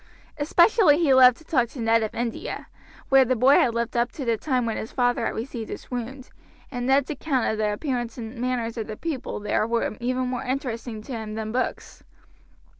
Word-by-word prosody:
Especially 335 Hz, +2 st, +5 dB
he 315 Hz, -5 st, +3 dB
loved 255 Hz, -2 st, +7 dB
to -, -, -17 dB
talk 250 Hz, -7 st, +1 dB
to 260 Hz, -, -11 dB
Ned 225 Hz, 0 st, +3 dB
of 220 Hz, -, -3 dB
India, 235 Hz, 0 st, -4 dB, 0.4 s
where 270 Hz, -1 st, +7 dB
the 255 Hz, 0 st, +1 dB
boy 255 Hz, +4 st, +5 dB
had 235 Hz, -2 st, +2 dB
lived 235 Hz, +1 st, -2 dB
up 240 Hz, +1 st, +1 dB
to 275 Hz, -, -5 dB
the 230 Hz, -1 st, +2 dB
time 250 Hz, +1 st, -1 dB
when 225 Hz, -, -2 dB
his 220 Hz, -, -5 dB
father 245 Hz, -1 st, +1 dB
had -, -, -4 dB
received 230 Hz, -1 st, -5 dB
his -, -, -8 dB
wound, 255 Hz, +2 st, -6 dB, 0.4 s
and 245 Hz, -2 st, -3 dB
Ned's 275 Hz, +2 st, +3 dB
account 280 Hz, -3 st, -1 dB
of 220 Hz, -, -1 dB
the 210 Hz, -1 st, +1 dB
appearance 240 Hz, 0 st, -3 dB
and 225 Hz, 0 st, -7 dB
manners 245 Hz, -2 st, -2 dB
of 220 Hz, -, -3 dB
the 215 Hz, -1 st, -6 dB
people 310 Hz, -10 st, -4 dB
there 210 Hz, +1 st, 0 dB
were 230 Hz, -2 st, -1 dB
even 255 Hz, +1 st, -1 dB
more 250 Hz, -1 st, -3 dB
interesting 240 Hz, -4 st, -4 dB
to 270 Hz, -, -10 dB
him 220 Hz, -3 st, -5 dB
than 220 Hz, -1 st, -4 dB
books. 255 Hz, +2 st, -3 dB
245 Hz, 210 wpm, -25 LUFS, 225-265 Hz, 0.4 s, loved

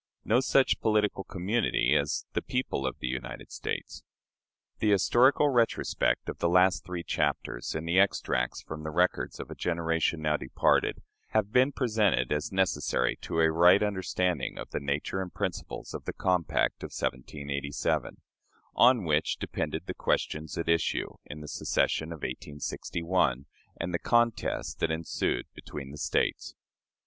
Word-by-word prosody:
No 115 Hz, +3 st, +4 dB
such 135 Hz, 0 st, +3 dB
Political 105 Hz, -3 st, +1 dB
Community 95 Hz, -, +1 dB
as 70 Hz, 0 st, 0 dB
the -, -, 0 dB
"People 125 Hz, -, -2 dB
of 65 Hz, -, -4 dB
the -, -, -4 dB
United 65 Hz, 0 st, -5 dB
States." -, -, -5 dB, 0.8 s
The 110 Hz, -, +2 dB
historical 120 Hz, +8 st, +4 dB
retrospect 120 Hz, -4 st, +1 dB
of -, -, -5 dB
the 85 Hz, -, +2 dB
last 90 Hz, -4 st, +4 dB
three 90 Hz, -2 st, -5 dB
chapters -, -, -1 dB
and 80 Hz, +1 st, -3 dB
the 85 Hz, +3 st, +3 dB
extracts 60 Hz, -10 st, +1 dB
from 80 Hz, -1 st, -7 dB
the 80 Hz, -, -4 dB
records 90 Hz, +4 st, 0 dB
of -, -, -7 dB
a -, -, -6 dB
generation 85 Hz, -1 st, 0 dB
now 75 Hz, 0 st, +2 dB
departed 65 Hz, -, +1 dB, 0.3 s
have 105 Hz, -1 st, +2 dB
been 130 Hz, +4 st, +4 dB
presented 110 Hz, -, +1 dB
as 75 Hz, 0 st, -1 dB
necessary 95 Hz, -9 st, +1 dB
to 80 Hz, -, -1 dB
a 80 Hz, 0 st, +4 dB
right 90 Hz, +5 st, +6 dB
understanding 90 Hz, -6 st, -1 dB
of -, -, -7 dB
the -, -, -2 dB
nature 70 Hz, +6 st, -2 dB
and 90 Hz, -2 st, -7 dB
principles -, -, -4 dB
of -, -, -6 dB
the -, -, -3 dB
compact 90 Hz, -4 st, +1 dB
of -, -, -4 dB
1787, 70 Hz, +2 st, -3 dB, 0.5 s
on 125 Hz, -5 st, +5 dB
which 75 Hz, -2 st, +1 dB
depended -, -, -3 dB
the -, -, -4 dB
questions 75 Hz, -1 st, -1 dB
at 85 Hz, -, -2 dB
issue 85 Hz, 0 st, +1 dB
in 75 Hz, +1 st, -8 dB
the 75 Hz, -, -8 dB
secession 80 Hz, +2 st, 0 dB
of 80 Hz, -3 st, -8 dB
1861 75 Hz, +1 st, -2 dB, 0.3 s
and 85 Hz, +1 st, -3 dB
the 85 Hz, -, 0 dB
contest 120 Hz, -1 st, +1 dB
that -, -, +1 dB
ensued 80 Hz, 0 st, -1 dB
between 70 Hz, -2 st, -8 dB
the 75 Hz, -, -9 dB
States. 70 Hz, 0 st, -1 dB
85 Hz, 155 wpm, -29 LUFS, 75-100 Hz, 0.8 s, right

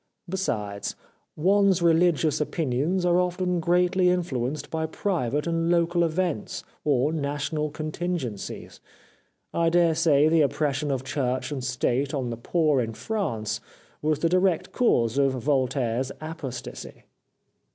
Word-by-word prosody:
Besides, 105 Hz, -, -3 dB, 0.4 s
one's 190 Hz, +2 st, +3 dB
religious 165 Hz, -2 st, +3 dB
opinions 155 Hz, +4 st, 0 dB
are 175 Hz, 0 st, +4 dB
often 180 Hz, 0 st, 0 dB
greatly 180 Hz, +2 st, +2 dB
influ 170 Hz, -9 st, 0 dB
enced 150 Hz, +2 st, -7 dB
by 160 Hz, 0 st, -1 dB
private 150 Hz, -, -1 dB
and 165 Hz, 0 st, 0 dB
local 170 Hz, 0 st, +2 dB
events 170 Hz, -, -2 dB, 0.2 s
or 145 Hz, +1 st, +2 dB
national 145 Hz, 0 st, -2 dB
contingencies. 155 Hz, -, -4 dB, 0.7 s
I 165 Hz, 0 st, +2 dB
daresay 165 Hz, -3 st, +4 dB
the 160 Hz, 0 st, +4 dB
oppression 145 Hz, 0 st, 0 dB
of 135 Hz, -2 st, -1 dB
Church 130 Hz, 0 st, -2 dB
and 135 Hz, -3 st, -3 dB
State 130 Hz, +2 st, 0 dB
on 125 Hz, -3 st, -2 dB
the -, -, -3 dB
poor 150 Hz, +2 st, +1 dB
in 115 Hz, -1 st, -4 dB
France 115 Hz, -, -2 dB, 0.4 s
was 155 Hz, 0 st, +1 dB
the 165 Hz, +3 st, +1 dB
direct 185 Hz, -1 st, +1 dB
cause 120 Hz, -, +2 dB
of 135 Hz, -1 st, +3 dB
Voltaire's 130 Hz, -1 st, 0 dB
apostasy.' 155 Hz, -6 st, -7 dB
155 Hz, 125 wpm, -26 LUFS, 130-175 Hz, 0.7 s, are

